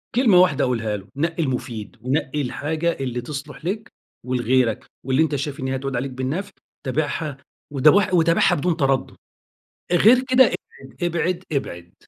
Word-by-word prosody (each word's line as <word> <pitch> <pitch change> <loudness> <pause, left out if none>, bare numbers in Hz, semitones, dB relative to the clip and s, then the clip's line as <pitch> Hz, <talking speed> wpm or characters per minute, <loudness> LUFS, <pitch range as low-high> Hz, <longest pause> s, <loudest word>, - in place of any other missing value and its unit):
كلمة 235 -7 +5
واحدة 145 -6 +3
اقولها 115 -5 -1
له، 95 +1 -13
نقّي 165 +3 -1
المفيد 125 -5 -4
ونقّي 135 +3 -1
الحاجة 155 +5 -1
اللي 125 -2 -3
تصلح 145 +3 -8
لك 210 +5 -3 0.3
ولغيرك، 125 -2 +1 0.2
واللي 135 +4 +3
أنت 150 -2 -1
شايف 140 +2 -4
إن 130 - -3
هي 135 - -1
هتعود 135 0 -3
عليك 130 +2 -2
بالنفع، 140 +11 -3 0.3
تابعها 145 +1 -2 0.4
وت 140 +2 +2 0.3
وتابعها 165 -1 +4
بدون 165 +3 0
تردّد، 135 -3 0 0.8
غير 225 +9 +6
كده 260 0 +7 0.4
ابعد، - - -14
ابعد، 175 +1 -1
ابعد. 85 - -4
140 Hz, 150 wpm, -22 LUFS, 130-165 Hz, 0.8 s, كده